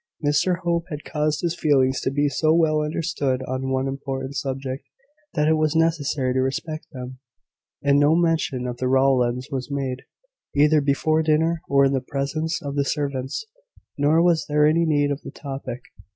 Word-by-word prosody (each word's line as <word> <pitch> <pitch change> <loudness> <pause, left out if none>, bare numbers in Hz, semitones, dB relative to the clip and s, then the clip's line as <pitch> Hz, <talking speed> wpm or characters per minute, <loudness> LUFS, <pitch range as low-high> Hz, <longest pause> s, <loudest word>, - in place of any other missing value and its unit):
Mr 150 +5 +2
Hope 170 -1 0
had 150 -3 -6
caused 150 -1 -1
his 170 -1 -1
feelings 135 -6 +2
to - - 0
be 145 +2 +1
so 155 +2 +1
well 155 -2 +3
understood 150 -4 -1
on 130 +1 -3
one 130 0 0
important 135 0 -4
subject, 135 -1 -4 0.5
that 150 -2 +2
it 160 - +4
was 155 0 +1
necessary 150 -5 +1
to 130 - +1
respect 155 +4 -3
them; 130 -2 -8 0.6
and 140 0 +4
no 145 +2 +4
mention 165 -7 +1
of 125 -1 -4
the 130 - -1
Rowlands 130 -2 +2
was 130 -1 -3
made, 135 -2 -3 0.5
either 150 +1 +4
before 150 +3 +1
dinner 160 +1 +1
or 140 0 +5
in 135 - +2
the 135 - 0
presence 155 +5 -3
of 140 -1 -4
the 140 - +2
servants. 140 - -3 0.5
Nor 150 +4 +3
was 170 -2 +2
there 150 0 +4
any 165 +2 +3
need 145 -2 +2
of 140 - -3
the - - -8
topic. 135 -3 -7
145 Hz, 180 wpm, -23 LUFS, 135-155 Hz, 0.6 s, or